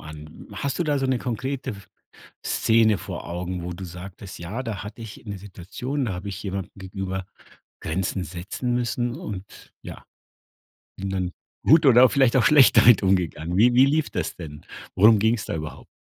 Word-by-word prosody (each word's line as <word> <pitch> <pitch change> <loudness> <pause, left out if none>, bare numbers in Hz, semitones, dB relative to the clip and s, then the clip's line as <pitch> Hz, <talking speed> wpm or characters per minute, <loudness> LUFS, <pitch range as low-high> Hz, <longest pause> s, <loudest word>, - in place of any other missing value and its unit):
an. 75 0 -11
Hast 135 +7 -3
du 175 - +1
da 145 -2 +1
so 135 - 0
'ne 130 -1 +1
konkrete 130 +3 -3
F 100 -3 -11 0.6
Szene 110 -2 +3
vor - - -7
Augen, 90 0 -4
wo 90 0 -4
du 95 - -8
sagtest: 90 +2 -9
„Ja, 95 +9 -5
da 110 -6 -5
hatte 105 +3 -9
ich 115 -2 -10
'ne 100 -2 -5
Situation, 105 +9 -5
da 105 - -2
habe 90 +3 -6
ich 100 +1 -6
jemandem 95 -2 -4
gegenüber 95 -1 -5 0.6
Grenzen 90 +3 -2
setzen 90 +9 -4
müssen 120 0 -1
und, 105 - -9
ja, - - -10 0.9
bin 95 - -4
dann 95 -2 -2 0.3
gut 155 +2 +6
oder 125 -1 +7
vielleicht 135 -2 +3
auch 125 - +4
schlecht 145 -2 +6
damit 115 -4 +7
umgegangen.“ 90 -3 0
Wie 120 +4 +5
wie 130 +2 +6
lief 150 +1 +1
das - - -3
denn? 75 -4 -10 0.3
Worum 105 +3 +6
ging's 110 +1 +1
da - - -3
überhaupt? 75 -1 -7
100 Hz, 180 wpm, -24 LUFS, 90-125 Hz, 0.9 s, oder